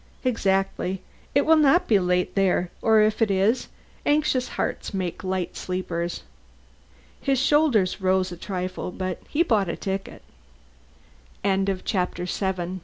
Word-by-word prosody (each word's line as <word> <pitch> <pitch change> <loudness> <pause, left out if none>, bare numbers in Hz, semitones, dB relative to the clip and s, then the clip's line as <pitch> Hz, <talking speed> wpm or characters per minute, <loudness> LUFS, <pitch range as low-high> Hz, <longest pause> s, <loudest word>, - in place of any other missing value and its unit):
"Exactly. 195 -5 0 0.3
It 280 - +4
will 320 0 +6
not 310 +5 +4
be 210 -3 +4
late 180 0 0
there 185 -2 +1
or 220 -1 +5
if 215 +1 +1
it 225 - +4
is, 200 +6 +2 0.4
anxious 290 -4 +2
hearts - - -3
make 185 -2 -3
light 185 -2 -2
sleepers." 175 -2 -3 1.0
His 275 -1 +1
shoulders 270 -9 +3
rose 185 0 +2
a 175 - -7
trifle, 185 0 -4
but 185 0 -4
he 315 +3 +2
bought 215 - +2
the 170 - -3
ticket. 195 0 -5 1.2
VIII 195 -1 +2 0.2
"PHILO! 185 -5 +1
PHILO! 180 0 -3
195 Hz, 135 wpm, -25 LUFS, 185-230 Hz, 1.2 s, will